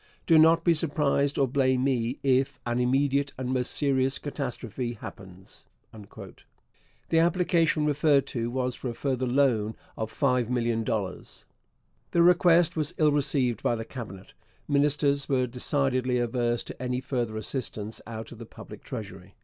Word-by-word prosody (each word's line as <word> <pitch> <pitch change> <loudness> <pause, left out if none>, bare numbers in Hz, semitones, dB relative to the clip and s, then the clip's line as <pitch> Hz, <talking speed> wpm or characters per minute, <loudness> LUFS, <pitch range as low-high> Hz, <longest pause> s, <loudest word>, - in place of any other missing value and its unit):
Do 165 -2 +6
not 165 +1 +5
be 170 - +4
surprised, 145 -3 +1
or 135 - +3
blame 130 -1 +1
me, 125 -2 0
if 135 0 +1
an 120 0 -1
immediate 140 +2 +1
and 130 -1 -4
most 125 -1 0
serious 135 -2 +1
catastrophe 125 -4 -4
happens. 95 -4 -12 0.2
The 110 +8 -7
application 165 -2 +2
referred 145 -1 +3
to 115 -1 -3
was 125 0 -1
for 125 - -5
a - - -4
further 130 -1 -1
loan 120 -5 +1 0.2
of 110 0 -4
$5,000,000. 115 -6 -1 0.6
The 170 - +3
request 175 -1 +4
was 155 -2 -2
ill 155 -1 +4
received 140 -5 0
by 120 - +1
the 115 0 -5
Cabinet. 105 -8 -9 0.3
Ministers 140 0 +1
were 130 -2 +2
decidedly 130 0 0
averse 120 0 0
to - - -10
any 125 0 -1
further 120 -4 -3
assistance 110 -2 -4
out 110 -1 -7
of 120 - -11
the 115 - -8
public - - -12
treasury. 95 -2 -8
130 Hz, 145 wpm, -27 LUFS, 120-145 Hz, 0.6 s, Do